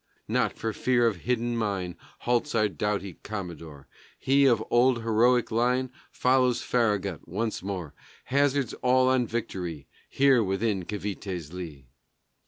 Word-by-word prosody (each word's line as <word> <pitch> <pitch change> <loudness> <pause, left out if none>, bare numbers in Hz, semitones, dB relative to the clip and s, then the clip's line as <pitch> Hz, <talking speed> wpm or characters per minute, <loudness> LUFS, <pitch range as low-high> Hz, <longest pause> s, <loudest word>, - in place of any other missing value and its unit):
Not - - 0
for 110 -1 -2
fear 125 0 +2
of 110 -5 +1
hidden 120 +4 -1
mine 100 -6 -2 0.3
Halts 120 +3 0
our 110 -1 +3
doughty 100 0 -3
Commodore. 85 -8 -7 0.3
He, 140 +1 +3
of 115 -4 +3
old 120 -1 +3
heroic 120 +2 +3
line, 125 +3 +1 0.2
Follows 125 -1 +2
Farragut 105 -7 0
once 110 +6 -2
more, 90 -6 -5 0.3
Hazards 140 -2 +1
all 130 0 +4
on 130 -2 +2
victory, 90 -10 -4 0.2
Here 135 -4 +4
within 95 -1 -1
Cavité's 95 -5 -5
lee. 80 -7 -8
110 Hz, 130 wpm, -27 LUFS, 95-125 Hz, 0.3 s, all